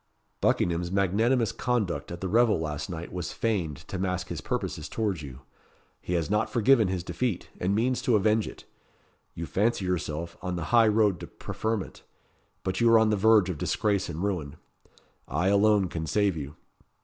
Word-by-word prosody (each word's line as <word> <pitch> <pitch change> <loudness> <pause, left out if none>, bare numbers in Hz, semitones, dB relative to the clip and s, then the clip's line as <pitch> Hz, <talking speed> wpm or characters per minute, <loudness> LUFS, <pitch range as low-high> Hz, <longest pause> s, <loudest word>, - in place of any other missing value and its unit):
Buckingham's 85 0 +1
magnanimous 110 +5 +2
conduct 105 - -1
at 85 - -7
the 95 - -2
revel 115 0 +3
last 75 +1 -4
night 85 -1 -6
was 90 -1 -4
feigned 90 - -1
to 95 - -5
mask 90 -1 -2
his - - -4
purposes 75 - -3
towards 100 -7 -1
you. 65 -2 -9 0.6
He 90 - -4
has 85 -3 0
not 105 +2 +1
forgiven 120 -2 +4
his 90 -2 -2
defeat, 115 0 -3
and 95 +3 0
means 125 +3 +1
to 120 - +2
avenge 110 +1 +2
it. - - -10 0.7
You 85 - -4
fancy 105 +2 0
yourself 85 -2 -3
on 90 -1 -3
the 85 - -3
high 115 -2 +7
road 105 -4 +3
to - - -7
preferment; 110 -2 -4 0.6
but 95 +2 -2
you 115 - +5
are 115 - +8
on 110 -1 +4
the - - +3
verge 105 -2 +4
of 80 - -7
disgrace 100 -3 0
and 85 +2 -4
ruin. 85 -8 -2 0.7
I 85 +8 0
alone 100 -1 +4
can 80 -2 -4
save 100 +1 +2
you. 75 -1 -6
95 Hz, 180 wpm, -27 LUFS, 85-110 Hz, 0.7 s, are